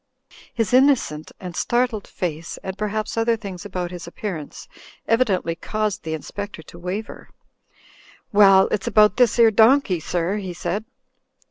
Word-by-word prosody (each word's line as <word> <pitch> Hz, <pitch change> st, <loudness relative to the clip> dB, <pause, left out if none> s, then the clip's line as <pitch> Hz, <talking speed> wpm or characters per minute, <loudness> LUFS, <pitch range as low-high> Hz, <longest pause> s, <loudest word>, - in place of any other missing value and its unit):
His 225 Hz, -2 st, -2 dB
innocent 255 Hz, -, +3 dB
and 180 Hz, -3 st, -7 dB
startled 240 Hz, -2 st, 0 dB
face, 165 Hz, -2 st, -5 dB
and 190 Hz, 0 st, -5 dB
perhaps 215 Hz, +2 st, -3 dB
other 230 Hz, 0 st, +2 dB
things 200 Hz, -3 st, -8 dB
about 180 Hz, -2 st, -4 dB
his 175 Hz, -2 st, -8 dB
appearance, 170 Hz, -4 st, -6 dB, 0.4 s
evidently 205 Hz, -8 st, +1 dB
caused 215 Hz, +3 st, -2 dB
the 160 Hz, -1 st, -3 dB
In 155 Hz, -, -7 dB
spector 205 Hz, -5 st, -7 dB
to 170 Hz, -, -13 dB
waver. 185 Hz, +5 st, -6 dB, 1.0 s
'Well, 195 Hz, -2 st, +6 dB
it's 205 Hz, -, -1 dB
about 210 Hz, -2 st, +4 dB
this 245 Hz, -3 st, +3 dB
'ere 230 Hz, -1 st, +6 dB
donkey, 220 Hz, -3 st, +4 dB
sir," 175 Hz, +5 st, -2 dB
he 190 Hz, -3 st, -5 dB
said. 180 Hz, +5 st, -3 dB
200 Hz, 145 wpm, -22 LUFS, 175-220 Hz, 1.0 s, Well